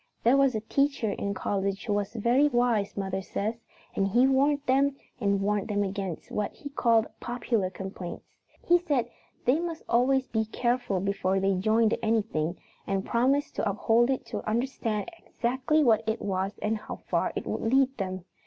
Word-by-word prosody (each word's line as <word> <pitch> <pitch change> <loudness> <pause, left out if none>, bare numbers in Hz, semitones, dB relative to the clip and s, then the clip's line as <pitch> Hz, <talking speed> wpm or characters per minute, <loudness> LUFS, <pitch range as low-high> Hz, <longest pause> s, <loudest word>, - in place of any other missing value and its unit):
There 240 +3 +5
was 275 -3 +3
a 215 - -1
teacher 275 -1 0
in 200 0 -3
college 195 0 -2
who 210 - 0
was 205 +2 -2
very 240 +6 +3
wise, 240 -7 +1
mother 190 -1 -2
says, 220 +4 -3 0.3
and 195 - +2
he 240 +6 +4
warned 280 +2 +3
them 275 +2 +3 0.2
and 200 -1 +1
warned 205 0 0
them 205 -2 0
against 195 -3 -4
what 210 -1 -1
he 285 - -8
called 230 -5 +3
popular 235 -5 -1
complaints. 190 -2 -7 0.4
He 350 +1 +5
said 275 -9 -1 0.3
they 260 +6 +3
must 335 -2 -4
always 260 +2 +3
be 220 -1 0
careful 235 -4 -1
before 195 -1 0
they 195 +1 +2
joined 215 +4 +2
anything 200 -7 0 0.3
and 195 0 -1
promised 265 +5 +1
to - - +1
uphold 225 +4 +2
it 265 - -1
to - - -4
understand 230 -2 -1 0.2
exactly 260 +5 +1
what 225 -5 +4
it 220 +1 0
was 195 0 -2
and 215 +1 0
how - - -7
far - - -1
it - - -3
would - - -3
lead 270 0 +3
them. 185 -2 -4
225 Hz, 175 wpm, -28 LUFS, 200-260 Hz, 0.4 s, There